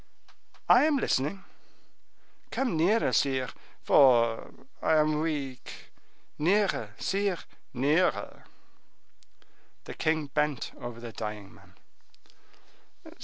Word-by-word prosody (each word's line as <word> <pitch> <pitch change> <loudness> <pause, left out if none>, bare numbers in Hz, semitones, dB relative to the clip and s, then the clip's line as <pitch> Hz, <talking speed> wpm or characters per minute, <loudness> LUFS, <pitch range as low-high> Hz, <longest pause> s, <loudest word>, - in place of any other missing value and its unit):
"I - - +6
am 310 -2 +2
listening." 190 - -1 1.1
"Come 260 -8 -1
nearer, 190 +8 +2
sire, 130 -3 +1 0.3
for 120 -4 +4 0.3
I 160 - +2
am 155 0 +2
weak!—nearer, 150 - -3
sire, 195 -1 -1 0.3
nearer!" 145 +8 0 1.4
The - - -8
king 155 -1 0
bent 150 -1 -2
over 120 -1 -7
the 120 -1 -8
dying 105 -3 -7
man. - - -20
150 Hz, 85 wpm, -28 LUFS, 125-180 Hz, 1.4 s, I